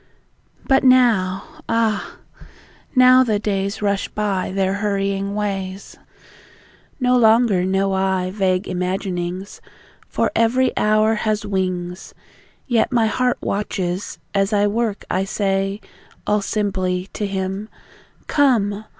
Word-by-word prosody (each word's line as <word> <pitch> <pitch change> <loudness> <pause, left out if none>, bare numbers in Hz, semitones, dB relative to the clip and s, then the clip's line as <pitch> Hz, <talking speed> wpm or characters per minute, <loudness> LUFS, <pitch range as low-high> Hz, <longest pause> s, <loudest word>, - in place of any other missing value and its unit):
But 270 -1 +3
now! 245 +1 +2
Ah, 225 -3 0 0.8
now, 255 0 +7
the 220 -4 +1
days 200 0 -2
Rush 200 -1 0
by 200 -4 -2
their 190 0 0
hurrying 200 -1 -1
ways! 195 -2 -4 1.0
No 250 -1 +3
longer 225 -5 +4
know 195 +1 0
I 190 -1 0
vague 190 -1 0
imaginings, 180 0 -3 0.5
For - - -1
every 245 +3 +2
hour 215 +1 +3
has 215 -1 -1
wings. 185 -2 -3 0.5
Yet 240 0 +1
my 235 -3 +3
heart 250 +3 +1
watches... 190 -2 -3 0.2
as 195 0 +1
I 205 0 +3
work 215 0 -1
I 185 +1 +1
say, 195 0 -1 0.5
All 210 0 +1
simply, 190 -3 -1
to 205 - -2
Him: 195 +2 -4 0.6
"Come! 220 -7 +1
200 Hz, 115 wpm, -20 LUFS, 190-220 Hz, 1.0 s, now